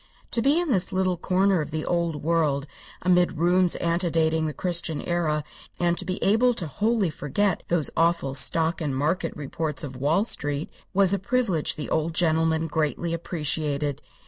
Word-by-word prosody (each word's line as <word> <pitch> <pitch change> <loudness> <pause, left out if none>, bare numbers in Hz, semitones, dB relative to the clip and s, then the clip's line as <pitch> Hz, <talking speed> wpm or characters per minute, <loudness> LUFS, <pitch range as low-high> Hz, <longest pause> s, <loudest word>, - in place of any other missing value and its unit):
To 230 - +3
be 280 +7 +3
in 350 -5 -1
this 190 -4 +2
little 185 -1 +1
corner 185 +1 +1
of 150 - -5
the 155 0 -3
old 170 -4 -1
world, 155 -4 +1 0.4
amid 180 -2 +2
ruins 175 +2 +3
antedating 165 -2 0
the - - -2
Christian 170 -1 -1
era, 155 -3 -1 0.4
and 175 0 +1 0.2
able 230 +5 +3
to 175 - -2
wholly 205 +3 0
forget 170 +7 -1
those 170 -4 +1
awful 165 -5 +1
stock 160 +4 +2
and 145 -4 -2
market 165 +4 0
reports 150 0 -3
of 135 -3 -6
Wall 145 +9 +1
street, 145 -8 -1 0.2
was 195 0 +4
a 200 - +1
privilege 200 -6 0
the 150 - -6
old 160 +1 0
gentleman 160 -1 +1
greatly 160 +2 -1
appreciated. 150 -4 -2
165 Hz, 160 wpm, -25 LUFS, 155-185 Hz, 0.4 s, was